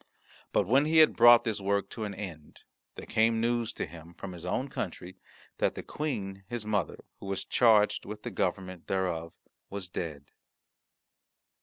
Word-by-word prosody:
But 100 Hz, -, +2 dB
when 135 Hz, +9 st, +4 dB
he 160 Hz, +1 st, +2 dB
had 155 Hz, -1 st, +7 dB
brought 120 Hz, 0 st, +8 dB
this 110 Hz, -4 st, -2 dB
work 100 Hz, 0 st, 0 dB
to 110 Hz, -, -4 dB
an 100 Hz, -1 st, -5 dB
end, 85 Hz, -7 st, -9 dB, 0.3 s
there -, -, -8 dB
came 115 Hz, +1 st, +2 dB
news 115 Hz, 0 st, 0 dB
to -, -, -3 dB
him 85 Hz, +1 st, -12 dB
from 95 Hz, -, -7 dB
his 90 Hz, 0 st, -6 dB
own 130 Hz, +9 st, -1 dB
country 90 Hz, -6 st, -6 dB, 0.4 s
that -, -, +1 dB
the -, -, -6 dB
Queen 95 Hz, -11 st, -4 dB
his 120 Hz, -2 st, -4 dB
mother, 105 Hz, -6 st, -2 dB
who -, -, -9 dB
was 95 Hz, 0 st, -2 dB
charged 110 Hz, -4 st, +4 dB
with 105 Hz, +1 st, -8 dB
the -, -, -4 dB
government 95 Hz, -2 st, -3 dB
thereof, 85 Hz, -4 st, -2 dB, 0.4 s
was 100 Hz, -2 st, -5 dB
dead. 75 Hz, -5 st, -5 dB
100 Hz, 170 wpm, -29 LUFS, 90-115 Hz, 0.4 s, brought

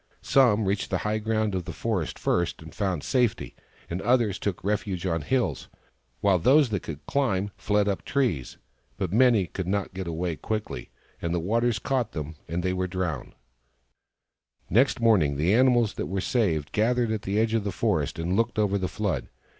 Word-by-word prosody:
Some 115 Hz, -6 st, +4 dB
reached 95 Hz, 0 st, -1 dB
the -, -, +1 dB
high 105 Hz, +1 st, 0 dB
ground 110 Hz, -1 st, 0 dB
of 90 Hz, -2 st, -2 dB
the 90 Hz, -, -5 dB
forest 95 Hz, -8 st, -2 dB
first, 85 Hz, -2 st, -1 dB
and 80 Hz, -, -11 dB
found 95 Hz, -7 st, -1 dB
safety, 125 Hz, -4 st, 0 dB, 0.3 s
and 85 Hz, +3 st, -4 dB
others 120 Hz, -6 st, +2 dB
took 100 Hz, -4 st, -3 dB
refuge 100 Hz, -3 st, -1 dB
on 85 Hz, -3 st, 0 dB
hills, 125 Hz, -, -1 dB, 0.5 s
while 100 Hz, -3 st, +3 dB
those 135 Hz, -, +5 dB
that 100 Hz, -5 st, -1 dB
could 75 Hz, -3 st, -8 dB
climb 105 Hz, -8 st, 0 dB
fled 105 Hz, -1 st, +1 dB
up 100 Hz, -2 st, -1 dB
trees. 120 Hz, -, -1 dB, 0.4 s
But 95 Hz, -2 st, -2 dB
many 115 Hz, -4 st, +5 dB
could 90 Hz, +1 st, -5 dB
not 100 Hz, 0 st, -1 dB
get 95 Hz, -1 st, -5 dB
away 85 Hz, 0 st, -2 dB
quickly, 110 Hz, -1 st, -4 dB, 0.3 s
and 85 Hz, 0 st, -1 dB
the -, -, +1 dB
waters 115 Hz, +6 st, +1 dB
caught 125 Hz, +1 st, -1 dB
them, 75 Hz, 0 st, -5 dB
and 85 Hz, +2 st, -2 dB
they 90 Hz, 0 st, 0 dB
were 95 Hz, 0 st, -1 dB
drowned 90 Hz, -7 st, -3 dB, 1.4 s
Next 125 Hz, -, +3 dB
morning 95 Hz, -12 st, +3 dB
the 85 Hz, +7 st, +2 dB
animals 120 Hz, -2 st, +4 dB
who -, -, -4 dB
were 95 Hz, +1 st, -2 dB
saved 85 Hz, -, 0 dB
gathered 120 Hz, +1 st, +1 dB
at 110 Hz, -2 st, -1 dB
the 100 Hz, +2 st, -2 dB
edge 110 Hz, 0 st, +1 dB
of 115 Hz, -2 st, +1 dB
the 100 Hz, -, -2 dB
forest -, -, 0 dB
and 85 Hz, +3 st, -1 dB
looked 115 Hz, +1 st, 0 dB
over 100 Hz, -2 st, +2 dB
the 95 Hz, -, -1 dB
flood. 95 Hz, -, -2 dB
100 Hz, 185 wpm, -26 LUFS, 90-115 Hz, 1.4 s, those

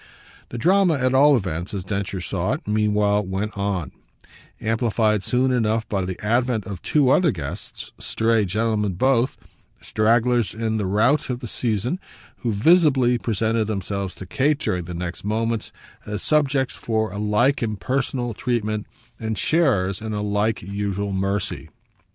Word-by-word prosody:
The 120 Hz, -, -6 dB
drama, 180 Hz, +5 st, +4 dB
at 130 Hz, -1 st, +1 dB
all 140 Hz, +2 st, +6 dB
events, 90 Hz, -4 st, -3 dB
as 95 Hz, -, -3 dB
Densher 100 Hz, -1 st, -3 dB
saw 80 Hz, -, -1 dB
it, -, -, -6 dB
meanwhile 105 Hz, -1 st, +2 dB
went 95 Hz, +3 st, -3 dB
on 100 Hz, -4 st, -2 dB, 0.7 s
amplified 110 Hz, -2 st, +1 dB
soon 130 Hz, +1 st, +2 dB
enough 115 Hz, -2 st, +1 dB
by 95 Hz, -3 st, -1 dB
the 95 Hz, -1 st, -5 dB
advent 120 Hz, -1 st, +1 dB
of 95 Hz, -3 st, -6 dB
two 140 Hz, -4 st, +3 dB
other 175 Hz, +2 st, +4 dB
guests, 80 Hz, -, -5 dB
stray 115 Hz, -1 st, +1 dB
gentlemen 105 Hz, 0 st, 0 dB
both, 130 Hz, +6 st, +2 dB, 0.4 s
stragglers 115 Hz, +1 st, +2 dB
in 110 Hz, -1 st, -1 dB
the 105 Hz, -3 st, -1 dB
rout 115 Hz, +11 st, +2 dB
of 125 Hz, -1 st, -2 dB
the 125 Hz, -, -6 dB
season, 120 Hz, -, -1 dB, 0.4 s
who 120 Hz, -, -2 dB
visibly 130 Hz, -, +4 dB
presented 110 Hz, 0 st, 0 dB
themselves 100 Hz, -2 st, -3 dB
to 95 Hz, -, -8 dB
Kate 140 Hz, +8 st, +1 dB
during 90 Hz, -, -2 dB
the 90 Hz, +1 st, -6 dB
next 90 Hz, 0 st, -5 dB
moments 110 Hz, +2 st, -1 dB, 0.4 s
as 105 Hz, 0 st, -3 dB
subjects 140 Hz, -3 st, +2 dB
for 110 Hz, -1 st, -1 dB
a 100 Hz, -, -5 dB
like 105 Hz, +7 st, +2 dB
impersonal 120 Hz, +3 st, -1 dB
treatment 110 Hz, -3 st, -2 dB, 0.3 s
and 110 Hz, -1 st, -3 dB
sharers 110 Hz, -, +2 dB
in 110 Hz, -1 st, -4 dB
a 105 Hz, 0 st, -2 dB
like 105 Hz, +2 st, 0 dB
usual 100 Hz, +1 st, -3 dB
mercy. 95 Hz, -3 st, -2 dB
110 Hz, 150 wpm, -23 LUFS, 100-125 Hz, 0.7 s, all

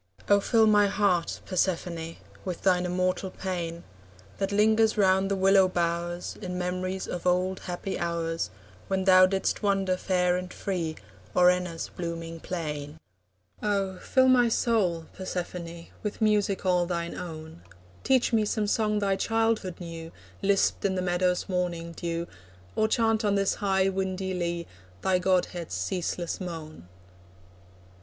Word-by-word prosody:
Oh, 205 Hz, 0 st, +5 dB
fill 225 Hz, +2 st, +4 dB
my 210 Hz, -1 st, +5 dB
heart, 195 Hz, -4 st, +1 dB
Persephone, 170 Hz, -3 st, -1 dB, 0.3 s
With 180 Hz, -2 st, -5 dB
thine 180 Hz, -2 st, +3 dB
immortal 185 Hz, +1 st, 0 dB
pain, 175 Hz, -3 st, -4 dB, 0.6 s
That 195 Hz, 0 st, -1 dB
lingers 220 Hz, +2 st, +3 dB
round 190 Hz, -1 st, +3 dB
the 200 Hz, -, +1 dB
willow 195 Hz, 0 st, +5 dB
bowers 175 Hz, 0 st, -2 dB
In 180 Hz, -2 st, -4 dB
memories 185 Hz, +1 st, -2 dB
of 180 Hz, 0 st, -3 dB
old 185 Hz, +1 st, +1 dB
happy 180 Hz, +2 st, -4 dB
hours, 165 Hz, -1 st, -2 dB, 0.4 s
When 190 Hz, -1 st, 0 dB
thou 185 Hz, -1 st, +7 dB
didst 195 Hz, 0 st, -1 dB
wander 195 Hz, -3 st, +1 dB
fair 180 Hz, -1 st, +1 dB
and 180 Hz, 0 st, -5 dB
free 170 Hz, -5 st, -3 dB, 0.4 s
O'er 180 Hz, 0 st, +7 dB
Enna's 180 Hz, -2 st, -3 dB
blooming 165 Hz, -1 st, -5 dB
plain. 150 Hz, -3 st, -5 dB, 0.6 s
Oh, 195 Hz, -3 st, -1 dB
fill 260 Hz, -1 st, +3 dB
my 245 Hz, -2 st, +5 dB
soul, 195 Hz, -9 st, +1 dB
Persephone, 170 Hz, -2 st, -5 dB, 0.2 s
With 210 Hz, -1 st, -4 dB
music 210 Hz, -3 st, +1 dB
all 180 Hz, -1 st, +3 dB
thine 170 Hz, -1 st, -2 dB
own! 160 Hz, -, -8 dB, 0.4 s
Teach 260 Hz, -2 st, +3 dB
me 220 Hz, -1 st, +4 dB
some 210 Hz, 0 st, 0 dB
song 210 Hz, 0 st, +1 dB
thy 200 Hz, -1 st, +1 dB
childhood 225 Hz, -4 st, 0 dB
knew, 165 Hz, -2 st, -7 dB, 0.3 s
Lisped 195 Hz, 0 st, +2 dB
in 190 Hz, -1 st, +1 dB
the 185 Hz, -, -1 dB
meadow's 180 Hz, 0 st, +1 dB
morning 175 Hz, -3 st, -2 dB
dew, 170 Hz, 0 st, -3 dB, 0.5 s
Or 220 Hz, -, +3 dB
chant 225 Hz, 0 st, +2 dB
on 205 Hz, -1 st, +2 dB
this 195 Hz, -1 st, +2 dB
high 190 Hz, -1 st, +2 dB
windy 190 Hz, 0 st, -2 dB
lea, 170 Hz, -1 st, -2 dB, 0.4 s
Thy 185 Hz, -1 st, +3 dB
godhead's 180 Hz, -, 0 dB
ceaseless 170 Hz, -, -2 dB
moan. 160 Hz, -, -7 dB
185 Hz, 140 wpm, -27 LUFS, 170-195 Hz, 0.6 s, thou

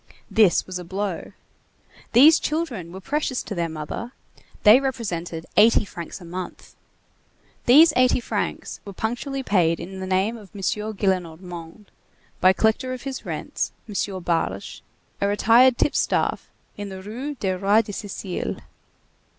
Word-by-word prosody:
This 210 Hz, -6 st, +4 dB
was 185 Hz, -1 st, -5 dB
a -, -, -7 dB
blow. 190 Hz, +1 st, -4 dB, 0.8 s
These 290 Hz, +7 st, +8 dB
children 260 Hz, -, -3 dB
were 190 Hz, -, -8 dB
precious 280 Hz, +3 st, -2 dB
to -, -, -6 dB
their 170 Hz, -3 st, -1 dB
mother; 160 Hz, -, -6 dB, 0.5 s
they 215 Hz, +4 st, +8 dB
represented 175 Hz, -11 st, -3 dB
eighty 215 Hz, 0 st, +6 dB
francs 170 Hz, -2 st, -8 dB
a 175 Hz, -, -12 dB
month. 180 Hz, +2 st, -8 dB, 0.9 s
These 305 Hz, +7 st, +8 dB
eighty 255 Hz, 0 st, +4 dB
francs 240 Hz, -, -3 dB
were 200 Hz, -, -9 dB
punctually 245 Hz, +7 st, -3 dB
paid 170 Hz, -7 st, +2 dB
in 190 Hz, +2 st, -7 dB
the 190 Hz, -, -5 dB
name 190 Hz, +5 st, +1 dB
of 205 Hz, -4 st, -13 dB
M. 200 Hz, -, -7 dB
Gillenormand, 185 Hz, -3 st, -3 dB, 0.5 s
by 185 Hz, -, +6 dB
collector 220 Hz, +6 st, +1 dB
of 255 Hz, -, -7 dB
his 270 Hz, -1 st, -6 dB
rents, -, -, -3 dB
M. 195 Hz, -3 st, -3 dB
Barge, 165 Hz, -, -2 dB, 0.4 s
a 200 Hz, -, +2 dB
retired 235 Hz, +5 st, +5 dB
tip -, -, +2 dB
staff, -, -, 0 dB, 0.3 s
in 205 Hz, -1 st, -6 dB
the 190 Hz, -1 st, -8 dB
Rue 255 Hz, +8 st, -5 dB
du 190 Hz, -7 st, -1 dB
Roi 200 Hz, +4 st, +3 dB
de 205 Hz, -, -7 dB
Sicile. 195 Hz, -2 st, -4 dB
205 Hz, 145 wpm, -23 LUFS, 180-240 Hz, 0.9 s, These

